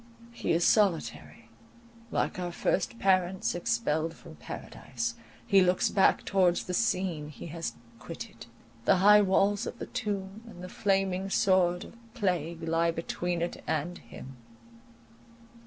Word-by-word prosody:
He 235 - -2
is 170 +1 +3
solitary; 115 - +1 0.6
like 185 - -1
our 175 -1 -3
first 185 +5 -1
parents 185 -2 +1
expelled 155 +2 -1
from - - -13
Paradise, 235 +1 -5 0.3
he 195 -4 +5
looks 180 0 +3
back 195 - +3
towards 180 -3 +2
the 180 - -5
scene 180 -8 0
he 150 - -10
has 165 -8 -4 0.3
quitted. 120 -5 -9 0.4
The - - +5
high 210 +3 +7
walls 200 +2 +2
of - - -6
the - - -5
tomb, 200 -2 -4
and 180 -6 -11
the 180 - -7
flaming 195 -1 0
sword 185 -4 +3
of 230 -1 -16
plague, 170 -5 -1
lie 165 +1 +1
between 170 +1 -2
it 175 - -5
and 160 +3 -2
him. 135 0 -11
180 Hz, 140 wpm, -29 LUFS, 165-195 Hz, 0.6 s, high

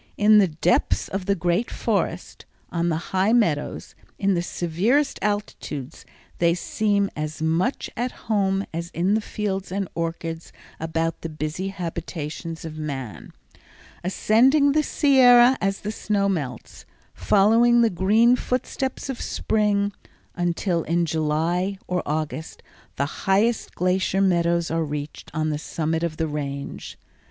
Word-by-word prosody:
In 210 +1 +6
the 195 - +5
depths 165 +2 +1
of 195 -1 -4
the 200 - +3
great 175 +6 0
forests, 190 -5 -2 0.3
on 170 0 0
the 165 +2 -4
high 190 +4 +3
meadows, 170 -12 0 0.2
in 195 0 +2
the 170 - +1
severest 190 - 0
altitudes, 185 -9 -4 0.3
they 170 0 +3
seem 200 +2 0
as 155 0 -4
much 165 - 0
at 245 +2 -2
home 195 -2 +1
as 170 +1 -4
in 180 +4 +2
the 220 - +2
fields 195 -3 -3
and 195 0 -2
orchards 165 0 -4 0.3
about 165 +1 -2
the 165 - -4
busy 155 +4 -4
habitations 165 -3 -5
of 155 -1 -7
man, 135 -8 -6 0.7
ascending 260 - +4
the 305 +2 +3
Sierra 260 -4 +6
as 195 -1 -1
the 210 - -3
snow 205 -2 0
melts, 140 - -4 0.3
following 230 +4 +4
the 230 - +3
green 215 +7 +4
footsteps 255 +2 -3
of 265 -3 -5
Spring, 205 -2 0 0.4
until 175 0 0
in 170 +2 0
July 165 +5 0
or 180 0 0
August 155 +1 -4 0.3
the 140 - 0 0.2
highest 215 +4 +2
glacier 185 +1 +1
meadows 170 -3 +2
are 165 0 +1
reached 150 0 -6
on 155 -1 0
the 150 - -2
summit 160 +1 -2
of 170 -2 -2
the 160 - 0
Range. 140 -2 -5
180 Hz, 140 wpm, -24 LUFS, 160-210 Hz, 0.7 s, In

